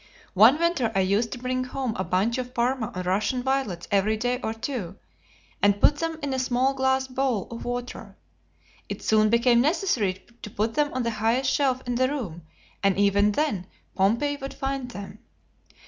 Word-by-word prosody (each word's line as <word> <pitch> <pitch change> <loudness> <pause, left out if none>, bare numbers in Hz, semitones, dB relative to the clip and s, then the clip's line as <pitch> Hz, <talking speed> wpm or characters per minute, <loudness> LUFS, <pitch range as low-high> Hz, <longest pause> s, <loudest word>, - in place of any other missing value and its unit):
One 220 +9 +7
winter 330 -9 +1
I 195 - +3
used 200 +4 +1
to - - -6
bring 255 +1 -2
home 255 -2 -3
a 185 - -2
bunch 210 +8 0
of 250 0 -6
Parma 240 -2 0
or 185 - -3
Russian 210 +7 0
violets 265 -10 -1
every 205 +2 +2
day 245 +2 -1
or 220 - -2
two, 225 -5 -5 0.7
and 205 0 +3
put 290 - +4
them 330 +1 -2
in 280 -2 -1
a 260 - -1
small 255 +1 +1
glass 265 0 +1
bowl 255 -6 -1
of 230 - -7
water. 245 0 -5 0.7
It - - -6
soon 215 0 +3
became 235 +1 +4
necessary 250 - 0 0.2
to 225 - -7
put 215 +2 -1
them 295 0 +1
on 255 - 0
the 235 - -1
highest 230 +5 +1
shelf 260 -3 +1
in 245 - -2
the 255 +2 +2
room, 210 - -5 0.4
and 195 -2 +2
even 200 +1 +3
then 205 - -1 0.3
Pompey 235 +10 +1
would 270 -1 -7
find 270 -2 -3
them. 200 -2 -9
245 Hz, 185 wpm, -25 LUFS, 205-265 Hz, 0.7 s, One